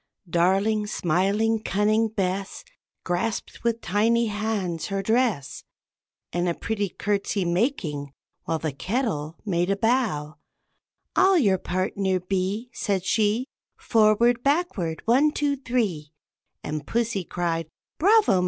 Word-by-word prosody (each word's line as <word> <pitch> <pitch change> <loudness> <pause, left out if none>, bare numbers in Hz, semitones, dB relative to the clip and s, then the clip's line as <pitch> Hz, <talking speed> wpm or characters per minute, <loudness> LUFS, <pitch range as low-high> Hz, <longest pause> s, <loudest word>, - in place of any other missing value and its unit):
Darling, 195 +5 +2
smiling, 205 +5 +1
cunning 215 +2 +2
Bess 195 -2 -3 0.4
Grasped 180 +5 -3
with 235 -1 0
tiny 230 +5 +2
hands 205 -6 -2
her 195 -1 -2
dress, 220 - 0 0.7
And 175 0 0
a 170 - -1
pretty 205 -3 -2
courtesy 200 0 -1
making, 170 - -1 0.3
while 165 - 0
the 155 -1 -3
kettle 170 - -2
made 175 -2 0
a 200 - +2
bow, 200 - 0 0.8
"I'll 380 0 +5
your 200 - +3
partner 185 +1 -1
be," 195 +6 -2
said 195 -5 -1
she; 220 +4 +2 0.3
"Forward, 230 +2 +3
backward, 275 - 0
one, 265 +6 +4
two, 290 -1 0
three;" 215 - -2 0.5
And 150 -1 -4
pussy 230 -4 0
cried, 165 -2 -2 0.3
"Bravo! 410 - +5
200 Hz, 115 wpm, -25 LUFS, 175-230 Hz, 0.8 s, I'll